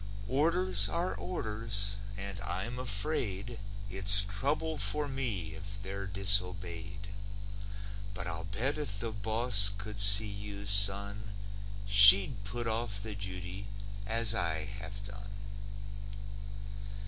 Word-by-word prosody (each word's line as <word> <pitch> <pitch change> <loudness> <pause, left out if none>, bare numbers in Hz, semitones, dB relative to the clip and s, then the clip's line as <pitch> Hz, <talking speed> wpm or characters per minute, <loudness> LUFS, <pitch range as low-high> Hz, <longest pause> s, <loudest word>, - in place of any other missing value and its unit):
Orders 170 +8 +1
are 170 +2 -3
orders 105 - -3 0.2
and 100 0 -7
I'm 115 +4 -6
afraid 115 -2 -2 0.3
It's 100 +1 +7
trouble 145 +10 -3
for 150 -1 0
me 115 -7 -5
if 100 +1 -9
they're 100 0 -7
disobeyed. 100 0 0 1.1
But - - -6
I'll 80 0 -6
bet 120 +11 -3
if 105 -9 -5
the 115 0 -5
boss 110 0 +2
could 105 +1 -8
see 100 +1 +4
you, 100 0 -9
son, 100 +1 +2 0.5
She'd 100 +2 +8
put 120 +4 -5
off 110 -2 -4
the 110 -1 -7
duty, 95 0 -8 0.4
as 115 0 +2
I 85 -5 -3
have 100 0 -9
done. 100 0 -10
100 Hz, 110 wpm, -30 LUFS, 100-115 Hz, 1.1 s, She'd